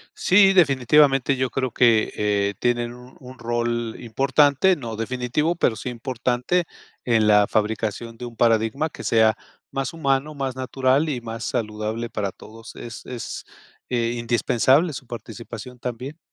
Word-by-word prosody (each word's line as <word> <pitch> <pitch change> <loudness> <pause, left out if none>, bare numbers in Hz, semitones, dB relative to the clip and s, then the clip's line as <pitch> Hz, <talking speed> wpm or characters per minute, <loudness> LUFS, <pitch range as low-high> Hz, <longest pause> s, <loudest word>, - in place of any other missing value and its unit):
Sí, 195 +1 +5
definitivamente, 140 -4 +4
yo 130 -1 0
creo 130 +1 -2
que, 115 -2 +3
eh, 100 -1 0
tienen 120 -1 0
un 125 +1 -14
un 130 -1 -12
rol 120 -1 -2
importante, 140 +8 +3
no 115 -7 -6
definitivo, 125 +8 -1
pero 125 -8 +1
sí 110 - -5
importante 125 +7 -1 0.4
en 115 -3 +3
la 105 -1 +5
fabricación 110 +2 -2
de 125 - -7
un 120 -1 -9
paradigma 115 +6 +2
que - - -10
sea 110 -1 +3 0.3
más 135 0 -3
humano, 140 -1 0
más 135 -2 -3
natural 130 +3 +1
y 130 -5 -3
más 115 0 -6
saludable 110 0 -3
para 100 -3 -3
todos. 115 +4 -13
Es 115 -3 -9
es, 125 -2 -6 0.4
eh, 120 -1 0
indispensable 125 +6 +2
su 130 -1 -8
participación 120 +1 -9
también. 125 +5 -6
120 Hz, 145 wpm, -23 LUFS, 115-135 Hz, 0.4 s, Sí